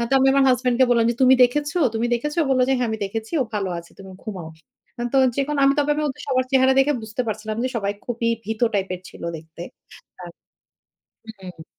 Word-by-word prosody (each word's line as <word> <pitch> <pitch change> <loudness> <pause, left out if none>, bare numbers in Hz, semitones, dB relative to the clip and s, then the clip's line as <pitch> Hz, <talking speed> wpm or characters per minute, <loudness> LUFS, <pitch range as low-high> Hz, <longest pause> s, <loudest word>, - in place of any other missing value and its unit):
আ - - 0
তো 270 - -6
আমি 265 - +3
আমার 275 0 +4
হাসব্যান্ড 250 -1 +2
কে 260 - +8
বললাম 230 -1 +3
যে, - - -2
"তুমি 260 0 +7
দেখেছো? 295 +7 -1 0.2
তুমি 225 +2 0
দেখেছো?" 295 +7 -3
ও - - -2
বলল 255 -1 +3
যে, - - +3
"হ্যাঁ 245 - 0
আমি 220 - -3
দেখেছি। 220 +5 -5
ও - - -4
ভালো 195 -2 -1
আছে। 170 - -12
তুমি 190 -1 -11
ঘুমাও।" 185 -7 -7 0.7
তো - - +5 0.2
যেকোনো 285 +1 -1
আমি 275 - +5
তবে 290 0 +1 0.2
ওদের 265 - -7
সবার 255 -2 +1
চেহারা 265 -1 +4
দেখে 285 +2 +4
বুঝতে 220 +3 -3
পারছিলাম 215 0 -4
যে, 255 - 0
সবাই 200 -2 -1
খুবই 235 -1 -2 0.2
ভীত 220 +1 -5
টাইপের 190 -2 -2
ছিল - - -14
দেখতে। 160 +2 -11 0.6
আর 175 - -8 1.1
হুম। 180 -4 -11
235 Hz, 215 wpm, -22 LUFS, 205-265 Hz, 1.1 s, কে